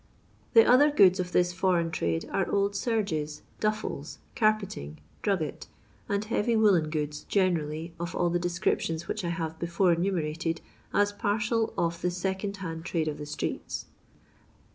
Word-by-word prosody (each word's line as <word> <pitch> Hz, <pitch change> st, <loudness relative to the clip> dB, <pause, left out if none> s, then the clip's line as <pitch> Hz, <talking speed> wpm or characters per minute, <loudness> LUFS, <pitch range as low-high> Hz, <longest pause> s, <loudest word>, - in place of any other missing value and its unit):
The 225 Hz, -, +9 dB
other 285 Hz, +4 st, +6 dB
goods 195 Hz, -9 st, +5 dB
of 180 Hz, -1 st, -2 dB
this 180 Hz, 0 st, +2 dB
foreign 175 Hz, -3 st, +1 dB
trade 85 Hz, -, -1 dB
are 195 Hz, -, +1 dB
old 200 Hz, 0 st, +1 dB
serges, 195 Hz, -10 st, -1 dB, 0.2 s
duffles, 165 Hz, -9 st, -2 dB, 0.2 s
carpeting, 195 Hz, -, 0 dB, 0.2 s
drugget, 190 Hz, -7 st, -1 dB, 0.4 s
and 200 Hz, 0 st, 0 dB
heavy 230 Hz, +1 st, +1 dB
woollen 195 Hz, -8 st, +4 dB
goods 150 Hz, -1 st, -3 dB
generally, 165 Hz, -4 st, 0 dB
of 170 Hz, +1 st, -4 dB
all 175 Hz, -1 st, +1 dB
the 175 Hz, -, +1 dB
descriptions 170 Hz, -1 st, -1 dB
which 215 Hz, -, -3 dB
I 170 Hz, -, -1 dB
have 160 Hz, -1 st, -3 dB
before 170 Hz, +1 st, +2 dB
enumerated 165 Hz, -2 st, -1 dB, 0.3 s
as 205 Hz, 0 st, +3 dB
parcel 215 Hz, +2 st, 0 dB
of 170 Hz, 0 st, 0 dB
the 180 Hz, -, +1 dB
second 190 Hz, +3 st, -3 dB
hand 165 Hz, -4 st, -5 dB
trade 165 Hz, -3 st, -1 dB
of 150 Hz, -1 st, -3 dB
the 150 Hz, -, -6 dB
streets. 150 Hz, -, -4 dB
175 Hz, 150 wpm, -28 LUFS, 160-200 Hz, 0.4 s, The